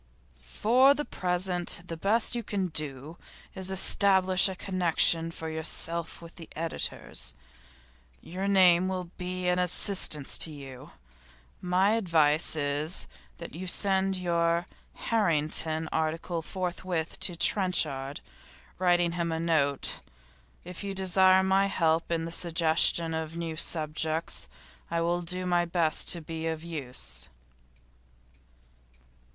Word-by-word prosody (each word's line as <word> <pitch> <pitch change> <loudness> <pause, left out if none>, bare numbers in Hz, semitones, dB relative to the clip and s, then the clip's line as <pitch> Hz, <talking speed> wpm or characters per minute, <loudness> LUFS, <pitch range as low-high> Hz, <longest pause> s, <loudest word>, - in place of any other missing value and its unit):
'For 240 - +3
the 295 - -3
present 180 -1 -1
the 170 - -6
best 210 +9 +1
you 240 - -2
can 195 -4 -3
do 150 0 -4 0.3
is 190 -1 -3
to 190 - -1
establish 190 0 +3
a 190 - -5
connection 170 -3 +2
for 165 -1 -7
yourself 165 +1 -3
with 170 +1 -12
editors. 165 +1 -3 0.8
Your 185 +5 -5
name 185 -2 +5
will 185 -2 -4
be 180 0 -3
an 180 0 +2
assistance 180 -5 +1
to - - +3
you. 135 -2 -10 0.7
My 185 +3 +2
advice 165 -8 +2
is, 150 +3 -2 0.3
that 170 - -9
you 185 +3 -7
send 195 +1 +1
your 170 -1 0 0.3
"Harrington" 160 -6 0
article 165 +2 -2
forthwith 180 -1 -4
to 175 - -1
Trenchard, 155 -8 +1 0.6
writing 175 -2 +2
him 170 -1 -2
a 160 - -2
note. 155 -4 0 0.6
If 180 +2 -8
you 200 -1 -4
desire 190 0 +4
my 190 +1 +2
help 165 -3 0
in 165 -1 -1
the 165 - -6
suggestion 165 -1 +3
of 160 0 -4
new 165 -1 -4
subjects, 155 0 -1 0.4
I 170 - -1
will 175 +1 0
do 180 +2 -2
my 175 -1 +2
best 165 -2 0
to 170 - +4
be 160 +1 -5
of 160 -1 -4
use. 125 - -5
170 Hz, 125 wpm, -28 LUFS, 160-185 Hz, 0.8 s, name